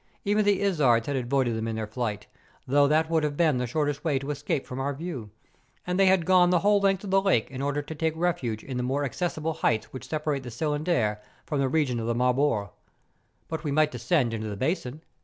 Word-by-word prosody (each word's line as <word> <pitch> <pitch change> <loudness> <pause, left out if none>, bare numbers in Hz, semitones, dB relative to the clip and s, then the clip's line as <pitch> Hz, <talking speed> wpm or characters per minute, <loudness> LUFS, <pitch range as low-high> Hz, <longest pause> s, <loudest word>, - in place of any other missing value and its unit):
Even 210 +1 +2
the 200 -1 +2
izards 135 -12 +3
had 140 - -2
avoided 125 -1 0
them 110 0 -3
in 115 - -2
their 110 -1 -2
flight, 105 -2 -4 0.4
although 140 +2 +4
that 155 +2 +2
woidd 160 -1 +1
have 150 -1 -2
been 155 -7 +3
the 125 - -1
shortest 145 +2 -1
way 155 -5 +1
to 140 +2 -3
escape 145 -1 -2
from 125 - -6
our 140 +1 -2
view; 140 -8 -6 0.6
and 180 +1 -1
they 195 - +5
had 185 -3 +4
gone 180 -1 +5
the 175 -2 +3
whole 205 +1 +4
length 195 -1 +2
of 195 - -5
the 195 0 +4
lake 160 - +1
in 130 0 -5
order 145 +1 -1
to 160 - -7
take 160 +1 -1
refuge 135 -11 -1
in 130 -2 -5
the - - -1
more 135 +3 -1
accessible 160 +1 -2
heights 110 -7 -1
which 130 - -8
separate 150 -3 -1
the 125 - -8
Cylindre 145 -4 0 0.3
from 150 - -2
the 135 -1 +1
region 135 -5 +1
of 115 - -3
the 120 - 0
Marbore. 125 -4 +1 0.8
But 160 0 -5
we 150 - -2
might 155 +1 +3
descend 140 -11 0
into 110 -1 -3
the 100 - -5
basin. 150 - -2
145 Hz, 230 wpm, -27 LUFS, 125-165 Hz, 0.8 s, they